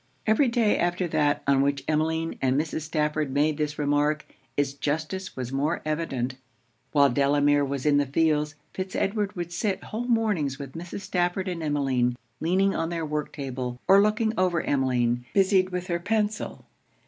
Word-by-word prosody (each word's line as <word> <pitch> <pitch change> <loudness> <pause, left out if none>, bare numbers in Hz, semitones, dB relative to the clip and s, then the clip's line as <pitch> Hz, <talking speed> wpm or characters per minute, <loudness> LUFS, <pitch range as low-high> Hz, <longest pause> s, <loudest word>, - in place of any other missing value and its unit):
Every 220 +6 +4
day 235 -3 +2
after 175 +1 0
that 150 -2 +1
on 140 -1 +4
which 140 0 0
Emmeline 160 +1 0
and 130 +1 +2
Mrs. 160 0 -2
Stafford 150 -1 -1
made 145 +2 +2
this 150 0 -1
remark, 145 +1 +1 0.3
it's 140 -1 +1
justice 155 +6 -3
was 125 -1 -4
more 145 +5 0
evident. 135 -5 -2 0.5
While 140 -3 +5
Delamere 145 +2 +3
was 140 -1 -3
in 145 -1 +4
the 145 -1 +2
fields, 150 +1 +1 0.2
Fitz 185 0 -5
Edward 205 0 -1
would 175 -1 -4
sit 195 +2 -1
whole 230 +3 -4
mornings 210 - +1
with 140 -1 -7
Mrs. 175 +4 -7
Stafford 185 0 -1
and 175 -2 -3
Emmeline, 135 -5 +1 0.2
leaning 190 +4 +2
on 165 - -1
their 165 -2 -2
work 150 0 -3
table, 130 -3 -5
or 195 +1 +7
looking 215 +1 +2
over 180 -3 +2
Emmeline, 125 -3 +1
busied 190 -1 +4
with 180 -1 -3
her 170 -2 -1
pencil. 210 +3 -2
155 Hz, 170 wpm, -26 LUFS, 140-185 Hz, 0.5 s, or